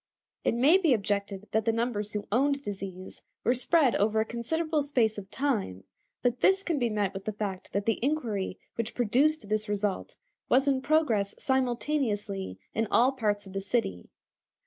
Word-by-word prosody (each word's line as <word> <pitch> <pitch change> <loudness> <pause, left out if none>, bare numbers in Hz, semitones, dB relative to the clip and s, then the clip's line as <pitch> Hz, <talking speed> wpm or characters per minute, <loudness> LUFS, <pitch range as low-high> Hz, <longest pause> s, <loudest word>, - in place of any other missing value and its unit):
It - - +1
may 290 +10 +5
be 320 -9 +4
objected 200 -1 -2
that 220 0 +1
the 225 - +3
numbers 225 -3 -2
who 210 -1 -3
owned 280 +4 +2
disease 190 -3 -7 0.2
were 245 - +3
spread 265 +1 +3
over 215 +2 +2
a 220 - +2
considerable 310 +7 -1
space 240 -7 +1
of 195 -1 -11
time, 210 - -1 0.4
but 245 0 +1
this 385 0 +4
can 330 -6 -1
be 240 -2 +1
met 205 -3 -1
with 195 0 -7
the 215 - -1
fact 200 -3 -5
that 200 0 -1
the 225 0 0
inquiry 230 -11 -1 0.2
which 230 0 -4
produced 250 +3 +2
this 215 0 -1
result 205 -1 -2 0.3
was 265 +3 +4
in 270 -2 +2
progress 255 -10 +1
simultaneously 240 - -1 0.2
in 225 0 0
all 250 +3 +4
parts 210 -6 -1
of 190 - -11
the 195 - -2
city. 195 - -2
225 Hz, 175 wpm, -28 LUFS, 205-265 Hz, 0.4 s, may